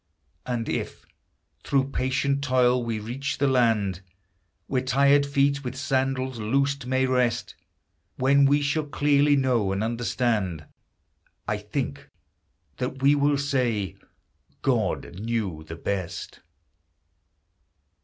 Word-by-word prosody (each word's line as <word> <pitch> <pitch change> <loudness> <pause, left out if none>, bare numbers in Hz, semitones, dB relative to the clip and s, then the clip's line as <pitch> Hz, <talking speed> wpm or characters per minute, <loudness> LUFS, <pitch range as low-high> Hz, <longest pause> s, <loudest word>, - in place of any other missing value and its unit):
And 120 -2 -2
if, - - -4 0.6
through 135 -1 +1
patient 140 +2 0
toil, 125 -2 +3
we 115 -2 -2
reach 135 +7 -4
the 140 - +1
land 110 -8 +2 0.6
Where 130 -2 0
tired 140 +2 +3
feet, 140 0 +1
with 125 -1 -5
sandals 130 -2 -1
loosed, 135 +4 0
may 130 +1 +2
rest, 125 -2 0 0.6
When 140 +2 +4
we 145 +1 +3
shall 145 +2 0
clearly 145 0 +3
know 125 -7 +1
and 100 +2 -1
understand, 115 - -1 0.8
I - - 0
think - - -4 0.7
that 130 +1 -4
we 140 +1 +6
will 145 0 +2
say, 125 -8 -1 0.3
" - - -41
God 90 - -1
knew 105 -8 -2
the 80 - -6
best 95 +1 -4
130 Hz, 115 wpm, -25 LUFS, 115-140 Hz, 0.8 s, we